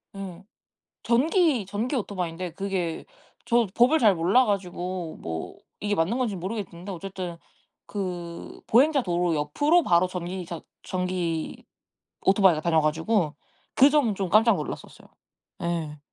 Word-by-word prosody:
예. 190 -2 -7 0.6
전기 275 - +2
전기 220 +8 -2
오토바이인데 180 -5 -3
그게 185 -4 -3 0.4
저도 235 -3 +2
법을 255 +7 +5
잘 215 -5 +5
몰라 185 +10 +4
가지고 180 -4 -3
뭐 80 -1 -5 0.2
이게 205 0 0
맞는 190 +7 +1
건지 240 -5 0
모르겠는데 190 -1 -5
어쨌든 180 -1 -6 0.5
그 175 -4 -6
보행자 275 +4 +4
도로 175 -3 0
옆으로 290 - +2
바로 175 -3 +4
전기 180 0 -5
자 170 -1 -6 0.2
전기 180 -3 -3 0.6
오토바이가 190 -5 +4
다녀 160 -1 +3
가지고 160 +2 0 0.4
그 275 - +8
점은 285 -8 +2
좀 190 -1 -2
깜짝 225 +4 +5
놀랐었어요. - - -7 0.5
예. 165 -3 -2
185 Hz, 285 characters per minute, -26 LUFS, 170-220 Hz, 0.6 s, 그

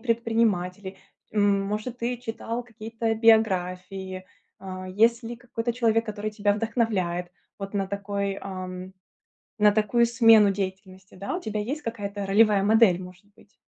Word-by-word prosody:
предприниматели, 220 -5 0 0.4
может, 205 +3 0
ты 245 +1 -2
читал 230 0 -5
какие-то 225 0 -3
биографии, 190 -4 +1 0.3
а. 185 -1 -7
Есть 230 +5 +3
ли 235 +1 -6
какой-то 235 0 -4
человек, 225 -1 +1
который 215 0 -4
тебя 205 -1 +1
вдохновляет 205 -6 -1 0.3
вот 195 +1 -7
на 195 -1 0
такой, 200 0 -3
ам, 185 -1 -7 0.7
на 210 0 +5
такую 220 +3 +2
смену 225 -3 +6
деятельности, 190 -1 -6
да. 200 - -4
У 365 - -5
тебя 215 -5 -3
есть 275 +9 -4
какая-то 205 -4 -5
ролевая 205 0 +4
модель, 205 -4 +4
может 180 +2 -13
быть? 205 - -23
210 Hz, 135 wpm, -25 LUFS, 190-225 Hz, 0.7 s, смену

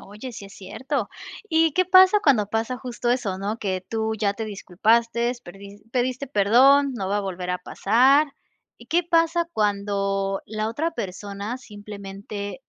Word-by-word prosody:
Oye, 210 +6 -9
sí 200 - -9
es 195 - -14
cierto. 245 +5 -4 0.4
¿Y 320 -1 +3
qué 370 - +2
pasa 375 +3 +7
cuando 240 -8 +3
pasa 225 +4 -2
justo 245 -1 -3
eso, 215 -7 -1
no? 205 +4 -3
Que 190 -3 -2
tú 220 -1 -1
ya 205 -2 +1
te 225 +2 -5
disculpaste, 230 +4 +1
perdi 200 +3 -12
pediste 255 +2 -1
perdón: 265 +5 +4
"No 195 -5 -3
va 205 +1 0
a - - 0
volver 185 -2 -4
a 180 - -1
pasar". 270 +11 +3 0.5
¿Y - - -15
qué 345 +2 +2
pasa 335 0 +2
cuando, 200 -2 -1
la 215 +1 -3
otra 320 +8 -2
persona 200 - -5
simplemente, 205 0 -8
220 Hz, 160 wpm, -24 LUFS, 200-265 Hz, 0.5 s, pasa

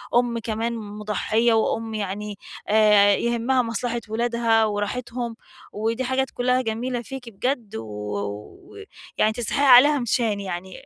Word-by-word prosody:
أُمّ 240 -1 +2
كمان 225 +1 -2
مُضحّية، 215 +2 0
وأُمّ 225 0 0
يعني 205 0 -4 0.3
آآ 210 -1 +5
يهمّها 235 +3 +1
مصلحة 235 +1 -3
ولادها 230 0 +2
وراحتهم، 230 +3 -3 0.4
ودي 225 +4 -2
حاجات 260 +1 0
كُلّها 250 +1 +1
جميلة 240 +1 -3
فيكِ 250 0 -8
بجد، 235 +1 -3
و 110 - -4
و 105 -1 -7 0.4
يعني 215 - +3
تستحقّي 240 +4 -1
عليها 290 +4 +6
نيشّان 230 -3 0
يعني، 185 -1 -6
225 Hz, 125 wpm, -23 LUFS, 210-240 Hz, 0.4 s, عليها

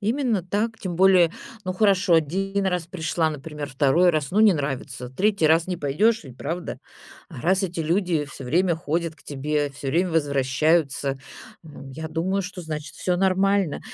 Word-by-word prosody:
именно 225 -2 0
так. 215 +5 -2
Тем 180 -4 -5
более, 185 -3 +5 0.4
ну, 185 - -2
хорошо, 195 -3 +3
1 195 +6 0
раз 180 -3 -1
пришла, 165 -2 -1
например, 150 0 -6
2 145 +6 +3
раз, 155 -5 0
ну, 210 +4 +2
не 210 -5 +6
нравится. 135 -3 -4
3 195 -2 +2
раз 165 +1 +4
не 180 -1 -3
пойдешь 190 +10 +1
ведь, 130 -1 -12
правда? 170 +4 -4 0.5
А - - -10
раз 190 +3 +2
эти 175 -3 -3
люди 170 -1 0
всё 135 - -10
время 170 +6 +2
ходят 165 0 -2
к 145 - -22
тебе, 145 +1 -2
всё 135 0 -6
время 175 +6 +1
возвращаются, 140 -1 +1 0.4
ну, 145 -3 -11
я 160 +3 -6
думаю, 180 +5 -1
что, 185 -1 -6
значит, 150 -3 -6
всё 180 -1 -1
нормально. 195 -2 +2
165 Hz, 170 wpm, -24 LUFS, 145-190 Hz, 0.5 s, не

